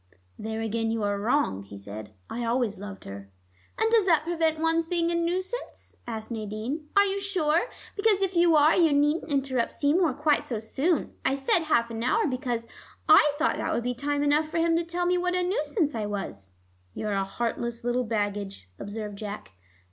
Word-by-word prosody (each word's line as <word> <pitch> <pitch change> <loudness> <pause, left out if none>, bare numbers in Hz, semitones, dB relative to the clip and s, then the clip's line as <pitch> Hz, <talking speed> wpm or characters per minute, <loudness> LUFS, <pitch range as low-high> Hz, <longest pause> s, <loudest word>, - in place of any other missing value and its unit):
"There 220 +1 -4
again 225 0 -1
you 225 -1 -1
are 205 0 0
wrong," 220 - +1
he 100 0 -11
said. 105 +1 -8 0.2
"I 240 - -4
always 235 -3 0
loved 205 -1 -8
her." 100 0 -9 0.5
"And 445 +1 +2
does 445 -4 +4
that 325 -4 +4
prevent 325 -1 0
one's 325 +1 +1
being 340 -1 +1
a - - 0
nuisance?" 365 +7 -3
asked 220 -1 -5
Nadine. 225 +7 -4
"Are 400 - +7
you 395 0 -1
sure? 370 +1 +1 0.3
Because 405 -2 +3
if 380 -1 -1
you 340 -1 +5
are, 300 +1 +6
you 330 -4 +4
needn't 295 +4 +2
interrupt 265 -3 0
Seymour 300 0 +2
quite 300 0 +2
so 230 -4 -3
soon. 275 +8 -1
I 265 - +2
said 275 +5 +1
half 235 -6 +2
an 225 0 -4
hour, 255 - +2
because 250 -4 -2 0.4
I 295 - +7
thought 320 +2 +1
that - - -2
would 235 - -1
be 250 +1 -1
time 285 +3 -1
enough 300 +2 +2
for 330 - -3
him 330 0 +3
to 340 - 0
tell 345 +1 -2
me 360 0 +2
what 360 0 0
a 365 - +1
nuisance 360 -5 0
I 215 -2 -2
was 100 - -6 0.2
" 90 0 -37
"You're 210 -1 -2
a 195 0 +1
heartless 235 +3 -3
little 245 +1 +1
baggage," 205 - -3
observed 205 -1 -6
Jack. 210 -1 -6
270 Hz, 200 wpm, -27 LUFS, 220-335 Hz, 0.5 s, Are